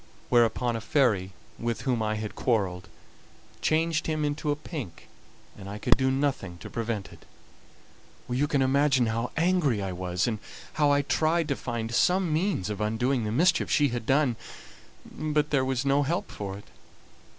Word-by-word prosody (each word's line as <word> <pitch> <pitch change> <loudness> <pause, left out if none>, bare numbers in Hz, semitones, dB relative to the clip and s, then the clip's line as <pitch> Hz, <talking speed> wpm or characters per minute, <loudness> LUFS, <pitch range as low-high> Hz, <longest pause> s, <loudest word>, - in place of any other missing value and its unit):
Whereupon 120 0 +3
a 115 - -3
fairy 105 -8 +2 0.3
with 115 -1 -2
whom 125 -4 0
I 110 0 0
had 110 0 -4
quarrelled 95 -7 -1 0.7
changed 160 0 +1
him 155 -1 0
into 150 +1 -2
a 145 - +2
pink, 145 - -8 0.5
and 95 - -9
I 100 - -5
could 105 - +4
do 130 0 +1
nothing 135 -10 -1
to - - -10
prevent 115 -3 -3
it. - - -16 1.0
"You 130 +4 0
can 140 -2 +2
imagine 135 -1 +3
how 115 +2 -1
angry 165 - +2
I 95 -1 -3
was, 90 0 -1
and 110 -3 -1 0.3
how 150 -1 +3
I 145 0 +3
tried 160 +3 +1
to 140 - +1
find 120 -3 -4
some 180 +4 +2
means 165 - 0
of 105 0 -4
undoing 115 +3 0
the 105 - -2
mischief 170 - +3
she 145 -2 +3
had 120 -2 -4
done; 135 -4 +2 0.7
but 150 -1 -1
there 135 -3 +3
was 130 0 -1
no 140 +1 +3
help 175 +8 -2
for 100 -1 -5
it. 100 - -13
130 Hz, 175 wpm, -27 LUFS, 110-150 Hz, 1.0 s, could